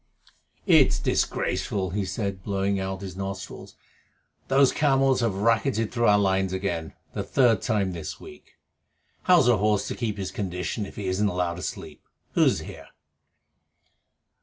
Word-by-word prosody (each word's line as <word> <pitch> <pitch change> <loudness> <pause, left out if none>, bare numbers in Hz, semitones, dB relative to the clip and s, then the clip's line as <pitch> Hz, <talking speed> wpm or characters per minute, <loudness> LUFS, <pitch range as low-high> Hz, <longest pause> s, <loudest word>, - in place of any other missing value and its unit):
"It's - - +5
disgraceful," 95 -3 -1
he 100 +1 -1
said, 100 -2 -3
blowing 100 -1 -1
out 95 0 -4
his 95 -2 -7
nostrils. 95 0 -7 0.7
"Those 135 0 +4
camels 135 -3 +2
have 115 -5 0
racketed 115 +2 +1
through 120 -1 +1
our 105 - +6
lines 95 -2 +1
again 95 -4 -3 0.2
the - - -2
third 120 -4 +2
time 100 -4 0
this 85 -3 -6
week. - - -14 0.7
How's 175 -8 +5
a 120 -3 +5
horse 105 0 +1
to - - -3
keep 110 -4 -3
his 95 -1 -4
condition 95 +2 -3
if - - -13
he 100 - -5
isn't 95 +3 +1
allowed 90 -2 -2
to - - -7
sleep. - - -7 0.3
Who's - - +3
here?" - - -10
100 Hz, 150 wpm, -25 LUFS, 95-115 Hz, 0.7 s, our